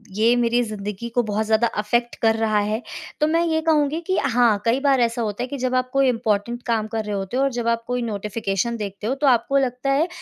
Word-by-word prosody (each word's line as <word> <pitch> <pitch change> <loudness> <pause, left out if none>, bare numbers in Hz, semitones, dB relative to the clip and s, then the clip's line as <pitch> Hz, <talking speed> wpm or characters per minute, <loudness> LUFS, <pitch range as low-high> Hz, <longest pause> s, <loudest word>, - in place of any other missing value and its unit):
ये 230 +3 +4
मेरी 240 0 +2
ज़िंदगी 210 0 -5
को 245 - +4
बहुत 215 0 -1
ज़्यादा 220 +2 +2
इफ़ेक्ट 235 +3 0
कर 225 -1 +3
रहा 220 -2 +1
है? 215 +3 -1 0.4
तो 300 - +3
मैं 330 +2 +2
ये 320 -1 +1
कहूँगी 310 -1 +1
कि 375 - +1
हाँ, 235 -5 +2
कई 235 +4 +2
बार 275 -2 +3
ऐसा 235 0 0
होता 215 +2 -2
है - - -3
कि 280 +1 -5
जब 255 0 -1
आप 255 0 0
कोई 275 -1 +3
इम्पोर्टेंट 230 0 -1
काम 220 -2 0
कर 220 0 -3
रहे 205 -1 -3
होते 195 +5 -3
हो 270 - +2
और 275 - +1
जब 240 -1 -3
आप 230 0 +1
कोई 245 0 -1
नोटिफ़िकेशन 210 0 -2
देखते 205 0 -5
हो 265 - 0
तो 285 - +3
आपको 265 +2 +3
लगता 260 +1 0
है 305 +5 +2
235 Hz, 245 wpm, -22 LUFS, 215-260 Hz, 0.4 s, ये